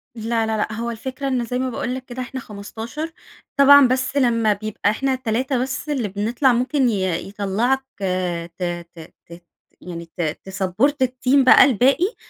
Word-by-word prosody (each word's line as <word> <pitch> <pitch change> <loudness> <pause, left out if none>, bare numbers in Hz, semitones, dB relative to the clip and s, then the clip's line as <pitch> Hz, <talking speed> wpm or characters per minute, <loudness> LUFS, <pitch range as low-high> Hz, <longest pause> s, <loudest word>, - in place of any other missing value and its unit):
لا، 225 0 -1
لا، 220 0 -1
لأ 215 0 -2
هو 235 +1 -3
الفكرة 260 +4 -5
إن 250 -3 0
زي 250 +2 -3
ما 260 - -1
باقول 250 +1 -3
لك 260 -1 -7
كده 250 +1 -6
إحنا 260 +1 -5
15، 225 +9 -7 0.5
طبعًا 280 -1 +8
بس 260 +2 -1
لما 230 -5 +3
بيبقى 205 0 -2
إحنا 265 +4 -1
3 255 +2 -1
بس 265 +4 -4
اللي 255 -7 -1
بنطلع 230 +7 +1
ممكن 255 +1 +1
ي 185 -5 -1
يطلعك 215 +7 0 0.7
ت 180 - -4 0.3
ت 160 -1 -12
ت 170 +1 -13 0.4
يعني 170 -1 -7
ت - - -1 0.2
تسابّورت 210 +9 0
الteam 255 +1 +2
بقى - - +8
الباقي، 275 - +2
240 Hz, 165 wpm, -21 LUFS, 210-265 Hz, 0.7 s, طبعًا